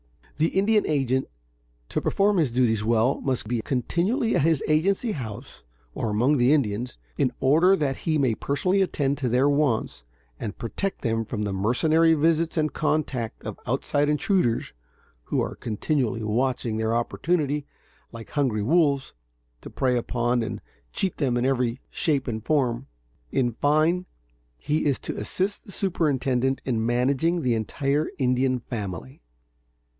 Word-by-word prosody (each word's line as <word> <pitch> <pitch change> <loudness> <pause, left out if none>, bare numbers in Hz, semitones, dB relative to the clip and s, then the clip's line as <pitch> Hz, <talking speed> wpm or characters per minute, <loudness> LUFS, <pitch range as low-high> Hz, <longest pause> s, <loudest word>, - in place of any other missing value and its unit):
The 155 +2 +3
Indian 210 +4 +2
agent, 135 -3 +1 0.6
to - - -1
perform 200 0 +2
his 155 -6 +2
duties 115 -3 +1
well, 115 +3 +2
must 130 -6 -1
be 120 0 -1
continually 180 - 0
at - - +3
his 160 -1 +2
agency 195 +9 +2
house, 110 - -7 0.3
or 115 - -2
among 125 +8 +2
the 125 +2 +4
Indians, 125 - 0 0.2
in 130 - +1
order 165 +8 +5
that 140 -6 -1
he 155 -2 0
may 130 -5 +2
personally 180 - 0
attend 145 -6 0
to 130 -3 0
their 125 +4 +3
wants 140 - 0 0.4
and 105 - -5
protect 195 - -4
them 115 -2 0
from 105 -1 -3
the 100 -2 -2
mercenary 155 +11 +3
visits 165 +2 +1
and 155 -1 +1
contact 140 -7 -1
of - - -6
outside 145 0 +1
intruders, 150 - +1 0.5
who - - -1
are - - -1
continually 120 0 -1
watching 115 0 0
their 110 +1 0
opportunity, 145 +3 -1 0.4
like 115 -1 -10
hungry 125 -8 0
wolves, 140 0 +2 0.5
to - - -9
prey 130 -2 0
upon 120 0 0
and 110 - -4 0.3
cheat 190 -3 -1
them 130 -5 +1
in 120 - 0
every 125 -2 0
shape 145 -6 0
and 110 -3 -3
form. 130 -3 0 0.4
In 120 -2 +1
fine, 155 +8 +1 0.5
he 150 - -1
is 140 - +2
to - - -4
assist 195 +2 -2
the - - -11
superintendent 135 -9 0
in 115 -4 0
managing 135 +8 +1
the 125 - +2
entire 140 +7 -1
Indian 130 -1 +1
family. 95 - -6
135 Hz, 150 wpm, -25 LUFS, 120-155 Hz, 0.6 s, order